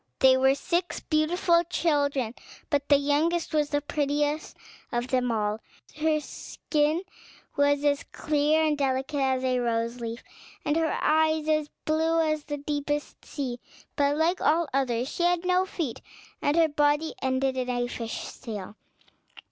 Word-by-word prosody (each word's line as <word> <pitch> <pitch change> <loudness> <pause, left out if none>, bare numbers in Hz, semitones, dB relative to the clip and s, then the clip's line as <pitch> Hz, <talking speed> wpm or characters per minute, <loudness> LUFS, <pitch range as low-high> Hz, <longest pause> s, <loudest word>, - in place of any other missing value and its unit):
They 260 -1 +6
were 265 +1 +4
six 345 +5 -1
beautiful 335 +2 +2
children; 285 -8 0 0.4
but 285 -1 0
the 285 - +7
youngest 310 +5 0
was 300 -1 +2
the 290 -1 0
prettiest 295 +1 -1 0.3
of 240 +1 -2
them 250 -2 +1
all; 210 -1 -1 0.4
her 310 0 +2
skin 300 +2 -1 0.5
was 285 0 +2
as 285 -1 +2
clear 305 +1 +2
and 305 -1 +2
delicate 270 +1 -1
as 260 -1 +1
a 255 -1 +1
rose 235 0 -1
leaf, 230 +1 -5 0.4
and 295 - +1
her 325 -1 +1
eyes 315 0 +2
as 305 -1 +1 0.2
blue 320 +1 +2
as 310 -2 0
the 290 -1 -4
deepest 290 0 -3
sea; 255 -5 -4 0.4
but, 285 0 +2
like 335 +4 +1
all 330 +2 +3
the - - +3
others, 245 -2 -1
she 345 - -5
had 350 0 +2
no 365 +1 +2
feet, 315 -11 -4 0.4
and 290 +3 +1
her 330 -1 +5
body 295 +1 +1
ended 260 0 0
in 255 -1 -2
a 245 -1 0
fish's 230 -2 -6
tail. 205 -3 -7
290 Hz, 155 wpm, -27 LUFS, 260-315 Hz, 0.5 s, the